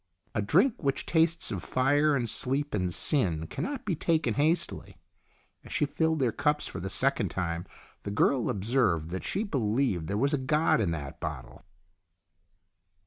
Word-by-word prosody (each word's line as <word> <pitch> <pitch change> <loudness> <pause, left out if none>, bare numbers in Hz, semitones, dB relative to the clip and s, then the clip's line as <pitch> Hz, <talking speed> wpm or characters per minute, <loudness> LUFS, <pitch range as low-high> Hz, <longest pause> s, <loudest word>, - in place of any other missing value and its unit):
A - - 0
drink 195 - +2
which 140 -3 -1
tastes 165 -3 +2
of 95 -5 -3
fire 145 +3 +2
and 120 -3 -1
sleep 135 +6 0
and 90 -3 0
sin 85 - +1
cannot 265 - -5
be 185 - 0
taken 160 -6 +1
hastily. 155 +6 0 0.7
As - - -13
she - - +1
filled 160 +2 0
their 130 -5 +1
cups 150 +6 0
for - - -6
the 95 +2 -4
second - - +1
time, 85 -1 -3 0.3
the - - -6
girl 115 +4 +2
observed 100 - +1
that 95 - -4
she 200 - -1
be 180 -11 -2
lieved 105 - 0
there 100 - -2
was 140 +6 +1
a 145 - +1
god 150 -1 +2
in 95 - +1
that 75 -5 -5
bottle. - - -7
130 Hz, 170 wpm, -28 LUFS, 100-155 Hz, 0.7 s, drink